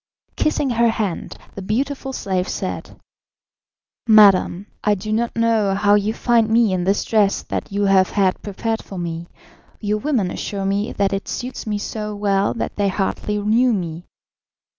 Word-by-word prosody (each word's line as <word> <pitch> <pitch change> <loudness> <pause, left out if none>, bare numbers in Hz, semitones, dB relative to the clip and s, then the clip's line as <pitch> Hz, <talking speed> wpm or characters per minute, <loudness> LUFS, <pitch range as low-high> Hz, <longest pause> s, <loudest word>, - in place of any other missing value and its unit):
Kissing 290 -3 0
her 235 0 +3
hand, 210 -6 -3 0.2
the 195 - -7
beautiful 270 +7 -2
slave 190 -7 -2
said: - - -5 1.1
"Madam, 200 -3 +5 0.2
I 210 0 +3
do 215 +3 -4
not 235 +2 -1
know 225 -4 +2
how 205 +1 +3
you 205 +1 +2
find 230 -1 +2
me 225 -3 +3
in 180 -1 -1
this 195 +2 +1
dress 210 -3 +2
that - - -5
you 200 +1 0
have 190 -1 +4
had 190 -3 +1
prepared 220 +2 -3
for 195 - -9
me; 170 -1 -4 0.5
your 210 0 -1
women 235 -9 0
assure 200 -1 -4
me 200 +3 0
that 200 -1 0
it 195 - -3
suits 250 -2 -5
me 210 -1 -1
so 210 0 -5
well 200 -1 +1
that 230 - -4
they 205 -1 +2
hardly 200 +2 -1
knew 225 +4 +2
me. 175 -3 -4
205 Hz, 165 wpm, -20 LUFS, 195-225 Hz, 1.1 s, Madam